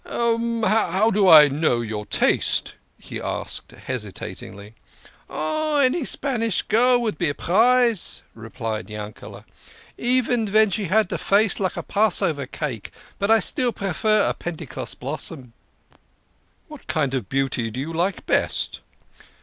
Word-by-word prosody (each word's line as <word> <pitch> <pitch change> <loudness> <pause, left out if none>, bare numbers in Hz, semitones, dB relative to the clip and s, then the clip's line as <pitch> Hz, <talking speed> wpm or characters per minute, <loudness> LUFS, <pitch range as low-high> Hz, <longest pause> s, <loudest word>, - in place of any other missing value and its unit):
"How 225 -3 +1
do 195 -2 +4
I 155 -3 +10
know 140 -4 0
your 105 -2 -5
taste?" - - +1 0.2
he - - -8
asked - - -4
hesitatingly. 105 -3 -7 0.6
"Oh, 300 - -1
any 280 +4 +2
Spanish 230 -8 0
girl 245 +2 +3
would 220 -3 -2
be 175 -4 +1
a 145 - -3
prize," 235 +2 +2
replied 110 -3 -6
Yankele". 105 0 -9 0.4
" - - -25
Even 245 -3 +1
ven 215 0 +4
she 200 +3 -1
had 210 +2 +2
a - - -2
face 205 +1 +2
like 190 -3 -1
a - - -3
Passover 195 -9 +1
cake. 125 -9 -5 0.3
But 220 +3 +4
still 250 -1 +1
I - - -5
prefer 205 +3 +1
a - - 0
Pentecost 165 -5 -6
blossom." 135 -2 -6 1.1
"What 300 -3 -13
kind 145 -5 0
of 125 -8 -3
beauty 130 -4 -1
do 115 +4 -6
you 155 +5 -4
like 180 +4 -1
best?" - - 0
185 Hz, 140 wpm, -23 LUFS, 135-225 Hz, 1.1 s, I